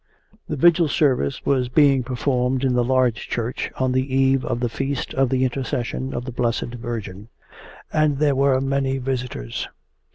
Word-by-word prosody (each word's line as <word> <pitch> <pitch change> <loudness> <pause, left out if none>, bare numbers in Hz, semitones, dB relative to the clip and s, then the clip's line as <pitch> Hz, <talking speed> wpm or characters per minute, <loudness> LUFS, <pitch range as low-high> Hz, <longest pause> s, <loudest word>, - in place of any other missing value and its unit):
The 155 - -1
Vigil 170 +3 +4
service 135 - +1
was 130 -3 +1
being 140 -1 +4
performed 125 +1 -1
in 130 -2 +2
the 125 0 +2
large 125 -2 +1
church 120 +1 -2
on 130 -1 +1
the 130 +1 0
eve 135 0 +3
of 120 - -2
the 120 - 0
feast 135 +3 -3
of 135 -1 +2
the 130 0 +1
Intercession 130 0 -2
of 120 - -4
the 130 - -5
Blessed 120 0 -1
Virgin, 110 -4 -6 0.7
and 155 -2 +2
there 145 -1 +2
were 135 -1 +3
many 135 0 0
visitors. 125 - -4
130 Hz, 165 wpm, -22 LUFS, 120-135 Hz, 0.7 s, Vigil